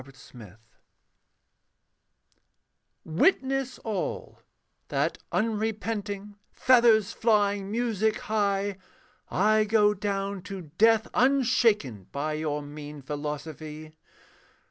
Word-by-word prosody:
THE 135 +1 -16
DESECRATERS 115 -6 -14 2.5
Witness 265 - +1
all: 210 -5 -4 0.5
that - - -1
unrepenting, 215 -2 -2
Feathers 235 -4 +4
flying, 205 -3 +1
music 220 -1 0
high, 205 -4 -1 0.5
I 215 +2 +3
go 210 -1 +4
down 200 -1 -3
to 185 -5 -8
death 225 0 +5
unshaken 230 - +2
By 150 +2 -2
your 150 -1 -2
mean 145 0 -9
philosophy. 150 +2 -6
205 Hz, 80 wpm, -27 LUFS, 155-220 Hz, 2.5 s, death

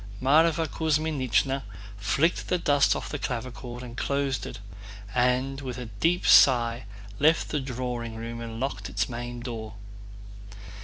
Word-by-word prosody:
Mávra 160 +4 +4
Kuzmínichna 145 -4 0 0.3
flicked 140 - +1
the 180 - +1
dust 145 -4 +3
off - - -5
the 145 - -4
clavichord 125 0 -5
and 120 -1 -8
closed 140 -5 -1
it, - - -7 0.6
and 125 +2 +1
with 130 -2 -5
a 125 - -5
deep 175 +2 +2
sigh 120 -3 +5 0.3
left 160 +3 +3
the 150 - 0
drawing 125 -3 -4
room 115 +1 -6
and 115 -1 -6
locked 120 -5 -3
its 105 +2 -1
main 120 0 -6
door. 110 -3 -6
125 Hz, 140 wpm, -27 LUFS, 120-140 Hz, 0.6 s, sigh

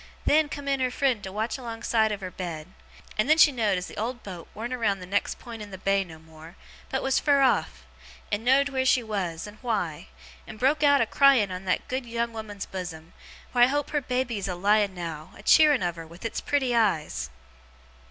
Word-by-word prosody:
Then, 305 0 +4
come 285 -1 -7
in 275 -1 +1
her 255 -1 +1
friend 255 -3 0
to 190 - -7
watch 220 +4 -2
alongside 225 -2 0
of 205 -1 -4
her 185 -1 -5
bed; 170 -3 -6 0.5
and 225 +7 +2
then 310 - +6
she 300 - +7
know'd 215 -7 +1
as 180 - -3
the - - -8
old 240 +3 -3
boat 180 -4 -8
warn't 235 +4 -4
round 210 -6 0
that 180 - -8
next 200 +3 -1
pint 230 -3 -9
in 210 - -8
the 190 - -8
bay 195 +1 +1
no 165 -4 -12
more, 160 +1 -14 0.3
but 265 - -2
was 270 0 +2
fur 285 -1 +3
off; 265 - +1 0.5
and 205 +1 -1
know'd 270 +3 +4
where 265 -1 0
she 255 -1 +3
was, 185 -7 -3
and 210 0 -12
why; 200 - -2 0.4
and - - -9
broke 275 +6 +2
out 285 -1 +5
a - - +3
crying 255 -5 +4
on 185 +1 -6
that 185 - -1
good 255 -1 -3
young 235 0 -2
woman's 210 -3 -6
bosom, 170 -3 -7 0.4
wheer 245 -1 +6
I - - +1
hope 290 +2 -1
her 295 - 0
baby 250 -3 -2
is 195 - -3
a 180 - -3
lying 200 +1 +2
now, 165 0 -6
a - - -13
cheering 300 -8 +5
of 175 -1 -1
her 165 -1 -8
with 170 +6 -12
its 230 - -3
pretty 265 -4 0
eyes! 170 - 0
220 Hz, 225 wpm, -26 LUFS, 185-260 Hz, 0.5 s, she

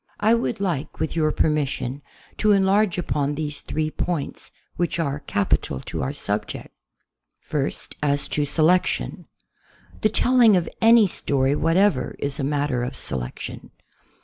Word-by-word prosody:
1 225 +3 +4
would 235 - -2
like, 175 -8 -3
with 160 - -2
your 155 -2 +2
permission, 145 -4 -1 0.3
to 215 -1 +3
enlarge 195 0 +3
upon 145 -4 -1
these 150 -1 -4
three 155 0 -2
points 165 -4 -3 0.3
which 175 0 -1
are 145 -3 -1
capital 95 - -1
to - - -5
our 65 - -1
subject. - - -3 0.7
First, 145 -2 -4
as 145 -1 +1
to 150 - 0
selection. 160 +5 +1 0.7
The 215 - +3
telling 235 -2 +5
of 170 - -1
any 225 -1 +7
story 140 -7 0
what 165 +3 +1
ever 195 -9 +2
is 140 0 -4
a - - -1
matter 140 -3 0
of 125 - -4
selection. 60 -2 -6
155 Hz, 145 wpm, -23 LUFS, 140-190 Hz, 0.7 s, any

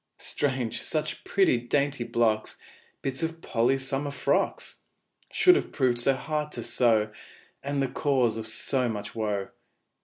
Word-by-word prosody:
Strange 130 -5 -1
such 155 -2 -2
pretty, 195 -10 +3
dainty 140 +2 0
blocks 110 -2 0 0.5
Bits 135 +1 -1
of 165 0 -2
Polly's 130 -1 +1
summer 140 +2 -1
frocks 140 - -1 0.5
Should 365 0 +6
have - - -1
proved 125 -4 +1
so 135 +2 +3
hard 150 +2 -3
to - - -4
sew, 110 -4 +2 0.5
And 140 0 -1
the - - +1
cause 130 -6 +1
of 110 0 -5
so 125 +3 0
much 105 -2 -5
woe! 105 -3 -2
130 Hz, 145 wpm, -27 LUFS, 115-145 Hz, 0.5 s, Should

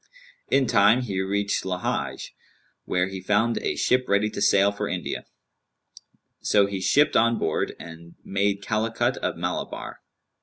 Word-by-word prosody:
In 135 - +3
time 110 +2 +4
he 100 -6 -2
reached 100 +1 -1
Lαhej 90 -1 -3 0.5
where 90 0 0
he 95 -1 -7
found 105 +5 +1
a - - -2
ship 125 0 +2
ready 100 +2 +2
to 100 - -5
sail 100 0 +4
for 100 0 -4
India; 85 -6 -4 1.1
so 100 -1 +3
he 100 -1 -4
shipped 145 +10 +3
on 115 +1 +3
board - - -1
and 85 +1 -11
made 100 +1 -1
Calicut 110 +1 0
of - - -3
Malabar. - - -5
100 Hz, 145 wpm, -25 LUFS, 95-110 Hz, 1.1 s, time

